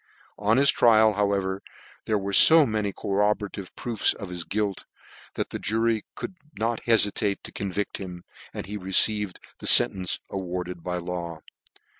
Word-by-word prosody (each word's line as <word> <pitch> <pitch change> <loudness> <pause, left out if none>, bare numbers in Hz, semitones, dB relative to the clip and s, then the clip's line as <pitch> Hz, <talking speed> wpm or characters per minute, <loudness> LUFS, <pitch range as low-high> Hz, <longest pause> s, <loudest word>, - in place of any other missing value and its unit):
On 105 +3 +2
his 140 +1 +5
trial, 110 -2 +4
however, 100 -1 -1 0.4
there 110 - 0
were 100 0 -4 0.2
lo 160 -1 +6
many 105 -3 -2
corroborative 100 0 -2
proofs 115 -4 0
of 100 -4 -8
his 90 -1 -6
gwjt, 105 -1 -3 0.5
that - - -3
the - - -5
jury 110 0 0
could 190 - -7 0.2
not 115 +1 -2
beiitate 105 -3 +2
to - - -10
convict 100 +1 -4
him, 90 -3 -8 0.3
and - - -7
he 105 +3 -6
received 105 +1 +2 0.2
the - - -5
fentence 95 -2 +4
awarded 90 -2 -5
by 90 -1 -3
law. 85 -2 -6
100 Hz, 150 wpm, -25 LUFS, 95-110 Hz, 0.5 s, lo